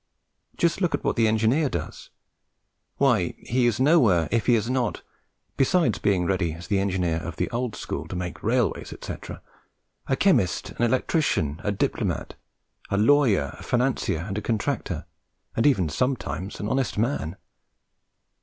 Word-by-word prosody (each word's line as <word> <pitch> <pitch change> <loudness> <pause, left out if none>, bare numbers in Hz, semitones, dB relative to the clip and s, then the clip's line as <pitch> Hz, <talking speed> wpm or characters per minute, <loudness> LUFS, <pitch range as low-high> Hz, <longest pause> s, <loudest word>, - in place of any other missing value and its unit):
Just 170 +2 +1
look 175 -4 +2
at - - -6
what - - 0
the 115 -2 +3
engineer 115 +7 +2
does. 80 -8 -6 0.9
Why, 120 -11 +2
he 125 0 +1
is 120 -1 0
nowhere 125 - +4
if 115 -1 0
he 120 - +6
is 110 0 0
not 125 -3 -1 0.5
(besides 135 - +2
being 95 -3 +1
ready, 90 -3 0
as 85 +2 -9
the 100 +1 +1
engineer 90 -4 0
of 85 0 -5
the - - -1
old 120 -1 -2
school, - - -5
to - - -6
make 90 -1 -5
railways, - - 0
etc.) - - -8 0.6
a 135 - +2
chemist, 125 - +2
an - - -7
electrician, 115 - 0
a 105 - 0
diplomat, 100 - -2 0.6
a 100 - 0
lawyer, 110 - +3
a - - -10
financier 120 -9 0
and 100 0 -2
a - - -7
contractor, 110 -1 -2 0.5
and 115 - +3
even 95 - +3
sometimes 110 - -2
an 105 - -3
honest 130 +1 -1
man. 105 - -1
110 Hz, 155 wpm, -25 LUFS, 90-130 Hz, 0.9 s, he